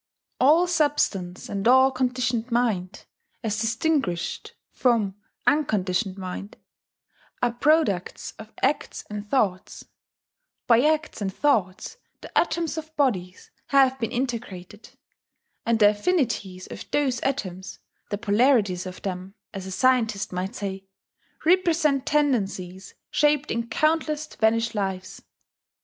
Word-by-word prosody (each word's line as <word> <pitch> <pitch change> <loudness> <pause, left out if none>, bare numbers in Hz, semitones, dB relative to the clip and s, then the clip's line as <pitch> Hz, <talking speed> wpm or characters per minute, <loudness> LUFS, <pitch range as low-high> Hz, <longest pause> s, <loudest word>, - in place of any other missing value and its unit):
All 310 +7 +5
substance 285 - 0
and 200 +1 -2
all 260 +2 +6
conditioned 250 -2 -1
mind 215 -5 -1 0.4
(as 220 -1 -1
distinguished 225 - -1 0.2
from 230 -6 +1 0.3
unconditioned 200 -9 +1
mind) 190 +1 -7 0.9
are 245 - +3
products 245 - +1
of 220 0 -11
acts 275 +3 0
and 210 0 -6
thoughts: 200 -8 -1 0.8
by 235 -1 +5
acts 310 -6 0
and 195 -1 -1
thoughts 205 - 0 0.2
the - - -12
atoms 330 -2 +1
of 315 0 -11
bodies 190 - -1 0.2
have 265 -1 +4
been 230 -3 -2
integrated; 225 -6 -5 0.8
and 230 -1 +3
the 205 -2 +6
affinities 210 - -1
of - - -9
those 270 -4 +1
atoms 190 -9 -3 0.3
the 205 - -2
polarities 205 -4 +2
of 185 - -9
them, 190 0 -5 0.2
as 190 -1 -6
a - - -6
scientist 225 -3 +1
might 185 +5 -3
say 195 -3 -5 0.6
represent 325 -6 +3
tendencies 200 -10 -1 0.2
shaped 295 0 +2
in 235 0 -2
countless 310 +3 +1
vanished 230 -4 +1
lives. 190 -3 -4
230 Hz, 115 wpm, -25 LUFS, 195-275 Hz, 0.9 s, all